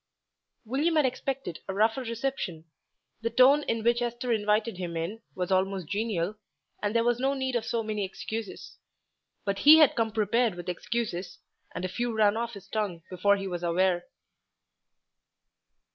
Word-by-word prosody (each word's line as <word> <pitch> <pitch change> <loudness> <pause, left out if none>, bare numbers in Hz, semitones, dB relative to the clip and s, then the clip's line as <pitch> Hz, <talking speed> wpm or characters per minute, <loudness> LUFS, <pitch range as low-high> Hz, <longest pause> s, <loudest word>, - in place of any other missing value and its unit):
William 290 +8 +1
had 305 -3 +4
expected 260 -7 -3
a 190 - -3
rougher 220 +5 +2
reception. 230 - -3 0.6
The 230 - 0
tone 260 +5 +6
in 230 -6 -2
which 235 +1 +3
Esther 240 +1 -2
invited 215 -1 +1
him 175 -2 -4
in 185 +8 -4
was 180 0 -3
almost 190 -2 +1
genial, 205 -3 -1 0.5
and 210 +2 -1
there 230 - +4
was 240 0 +1
no 270 +2 +1
need 265 -2 -2
of 230 -2 0
so 230 -1 -1
many 215 -1 -2
excuses; 215 +2 -6 0.7
but 200 -1 -1
he 300 +6 +9
had 305 -4 +6
come 225 -1 0
prepared 225 0 +1
with 175 0 -6
excuses, 180 -1 -3 0.4
and 185 - -3
a - - 0
few 235 +5 -2
ran 210 -1 +4
off 235 0 -3
his 200 -1 -11
tongue 200 -6 -3
before 200 +3 +3
he 195 0 -4
was 175 -2 -4
aware. 175 +1 +1
220 Hz, 165 wpm, -28 LUFS, 190-240 Hz, 0.7 s, he